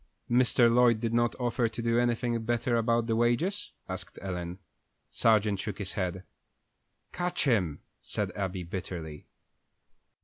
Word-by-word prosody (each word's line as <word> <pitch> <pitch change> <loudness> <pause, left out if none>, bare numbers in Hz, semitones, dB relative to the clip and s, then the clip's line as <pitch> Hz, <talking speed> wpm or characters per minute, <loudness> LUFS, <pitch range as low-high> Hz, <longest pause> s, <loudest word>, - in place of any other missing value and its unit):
"Mr. 120 -1 +5
Lloyd 120 -2 +5
did 115 0 -2
not 120 0 +2
offer 120 -1 +1
to 110 - -9
do 115 0 +2
anything 120 -1 0
better 120 +1 0
about 115 0 +2
the 115 -1 0
wages?" 120 - +1 0.2
asked - - -7
Ellen. 90 -2 -4 0.5
Sargent 105 -3 +3
shook 100 0 -4
his 100 -3 -3
head. 90 -1 -3 0.9
"Catch 180 0 -1
him!" 95 - +1 0.2
said - - -2
Abby, 95 -2 -3
bitterly. 85 -4 -6
115 Hz, 135 wpm, -29 LUFS, 95-120 Hz, 0.9 s, Mr